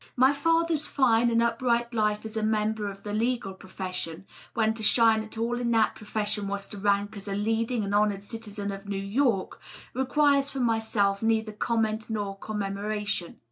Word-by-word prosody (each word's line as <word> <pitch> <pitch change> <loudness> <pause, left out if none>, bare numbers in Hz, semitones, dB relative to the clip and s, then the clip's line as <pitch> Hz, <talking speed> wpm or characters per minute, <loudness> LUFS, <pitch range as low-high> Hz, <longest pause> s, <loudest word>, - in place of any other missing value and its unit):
My 260 +2 +5
father^s 330 0 +1
fine 240 -3 +3
and 230 0 +3
upright 235 0 +1
life 210 -1 0
as 220 - -7
a 220 - 0
member 215 -1 0
of 195 0 -10
the 205 - -5
legal 230 -2 0
profession, 185 -2 -6 0.3
when 220 -1 +2
to 225 - -8
shine 225 0 +4
at 220 +1 -8
all 235 +2 -1
in 240 -1 -1
that 225 -1 +3
profession 210 -1 -2
was 200 0 -3
to 205 - -7
rank 205 +1 +1
as 200 0 -9
a 195 - -2
leading 225 +2 0
and 200 0 -3
honored 205 -1 +2
citizen 205 -2 -5
of 195 +1 -8
New 200 - -2
York, 200 +1 0 0.3
requires 280 +2 +3
from 270 -2 -2
myself 220 -4 +1
neither 220 -1 +1
comment 220 0 -1
nor 205 -3 -2
commemoration. 205 -2 -3
220 Hz, 180 wpm, -27 LUFS, 200-235 Hz, 0.3 s, My